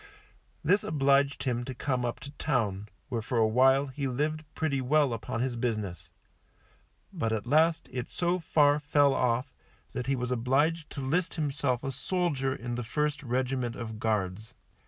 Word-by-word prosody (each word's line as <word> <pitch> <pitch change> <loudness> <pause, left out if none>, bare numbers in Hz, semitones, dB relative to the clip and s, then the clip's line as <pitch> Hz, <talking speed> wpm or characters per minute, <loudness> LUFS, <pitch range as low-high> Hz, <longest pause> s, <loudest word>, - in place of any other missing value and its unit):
This 200 - +3
obliged 140 -2 +2
him 120 -2 -1
to 130 +1 -6
come 125 -1 -1
up 120 - -3
to 140 - -8
Town, 105 -8 -1 0.2
where 120 -3 -1
for 120 +2 -2
a 110 -1 +5
while 130 +4 +4
he 135 +1 -3
lived 150 +5 -1
pretty 140 -4 0
well 140 0 +3
upon 115 0 -3
his 125 -1 -1
business; 110 -6 -3 1.0
but 115 - -1
at 110 -2 -1
last 160 +5 +3
it 125 -1 -4
so 175 +1 0
far 150 -3 +3
fell 145 -1 +3
off 125 +1 0 0.4
that 125 0 -3
he 135 - +2
was 125 0 -3
obliged 145 +7 +1
to 140 - -5
list 165 +7 0
himself 140 -5 -1
a 135 - -2
soldier 140 -3 -1
in 120 -1 -5
the 120 0 -2
first 150 +5 -1
regiment 125 -1 -1
of 110 -2 -6
Guards. 110 +1 -2
130 Hz, 170 wpm, -29 LUFS, 120-145 Hz, 1.0 s, a